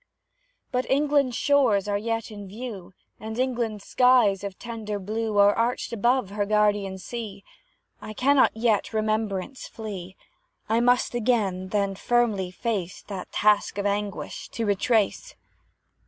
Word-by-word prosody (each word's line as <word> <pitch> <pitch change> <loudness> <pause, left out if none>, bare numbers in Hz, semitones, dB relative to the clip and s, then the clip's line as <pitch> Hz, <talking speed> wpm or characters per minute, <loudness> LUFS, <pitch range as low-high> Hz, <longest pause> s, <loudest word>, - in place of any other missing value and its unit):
But 255 -1 -1
England's 280 -2 +2
shores 250 -10 +3
are 205 - 0
yet 225 +2 -2
in 205 -2 -8
view, 200 -3 -8 0.2
And 220 +1 -6
England's 235 -5 -1
skies 250 -6 +4
of 200 -2 -5
tender 220 -3 -5
blue 215 +2 -3
Are 200 0 +6
arched 235 +1 -1
above 235 -1 +1
her 205 0 -1
guardian 205 -2 +2
sea. 200 0 -7 0.6
I 215 - -7
cannot 270 -2 +3
yet 225 -2 +1
Remembrance 215 +2 -2
flee; 190 -4 -7 0.5
I 225 +1 +2
must 245 +1 +3
again, 215 -6 0
then, 200 0 0
firmly 215 -3 +1
face 185 -2 -3
That 195 -3 -7
task 210 -1 +2
of 200 - -2
anguish, 205 0 -3
to 230 - -2
retrace. 215 - +1
215 Hz, 135 wpm, -25 LUFS, 200-240 Hz, 0.6 s, Are